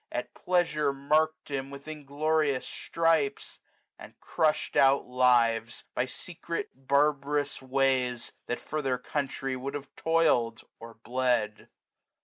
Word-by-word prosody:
At - - -4
pleasure 165 -5 +1
mark'd 155 +3 0
him 135 -1 -3
with 140 +1 -10
inglorious 150 -1 0
stripes; 165 -4 0 0.4
And - - -13
cmsh'd 155 -1 0
out 135 +1 +5
lives, 120 -2 +2
by 125 - 0
secret 170 +3 -6
barbarous 145 +2 +1
ways. 130 -2 0 0.2
That 120 - -2
for 155 - -4
their 130 -3 0
country 135 -1 -3
would 135 +2 -5
have 145 -1 -8
toil'd, 140 -9 +2 0.2
or 115 0 -11
bled. 120 -3 -1
140 Hz, 120 wpm, -29 LUFS, 125-150 Hz, 0.4 s, out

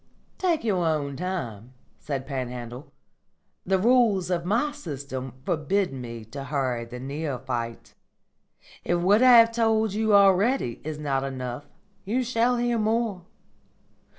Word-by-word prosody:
"Take 345 -4 +1
your 195 -6 +1
own 150 -4 -1
time," 130 - -5 0.3
said 135 -3 -4
Panhandle. 125 -1 -6 0.8
"The 190 0 +3
rules 210 -4 +3
of 170 -1 -1
my 235 +10 +1
system 140 - -6
forbid 170 +2 0
me 115 -3 -7
to 135 +5 -8
hurry 130 -4 -1
the 125 +1 -9
neophyte. 130 -4 -4 0.9
If 175 - +1
what 195 +6 +4
I 255 -2 +8
have 230 0 +7
told 220 -2 +1
you 215 0 +2
already 200 - +3
is 155 +1 -5
not 140 -3 -1
enough, 130 0 -5 0.4
you 240 +6 0
shall 245 0 +1
hear 240 -1 0
more. 215 -4 0
170 Hz, 130 wpm, -26 LUFS, 130-220 Hz, 0.9 s, I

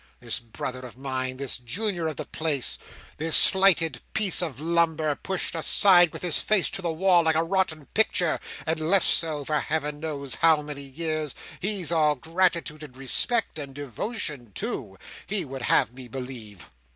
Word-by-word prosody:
This 120 0 0
brother 120 +2 -6
of 125 -2 -11
mine! 130 -1 -3
This 140 -1 -2
junior 170 - -3
of 155 - -3
the - - -4
place, 155 -5 -1 0.4
this 160 +1 +5
slighted 190 -4 +5
piece 210 -5 +2
of 155 -7 -4
lumber, 160 -1 +1
pushed 190 +6 -4
aside 175 +1 +5
with - - -9
his 170 -5 +4
face 215 -4 +1
to - - -5
the 170 -2 -1
wall, 180 +2 +3
like 160 -1 +1
a 160 - +2
rotten 165 -4 -1
picture, 195 -6 +1 0.3
and 160 0 -1
left 175 +5 +2
so, 155 -4 +3
for 150 +1 0
Heaven 150 -1 -2
knows 145 -4 -5
how 160 -2 +3
many 145 -1 -7
years 155 +1 -3 0.2
he's 190 -4 -1
all 155 -3 +3
gratitude 165 +1 -1
and 135 -4 -11
respect, 160 - +1
and 140 -2 -8
devotion 145 - -5
too, - - -5 0.3
he 200 -3 -1
would 135 -1 -7
have 120 - +2
me 130 -1 -9
believe!" 120 -6 -8
155 Hz, 170 wpm, -25 LUFS, 135-175 Hz, 0.4 s, this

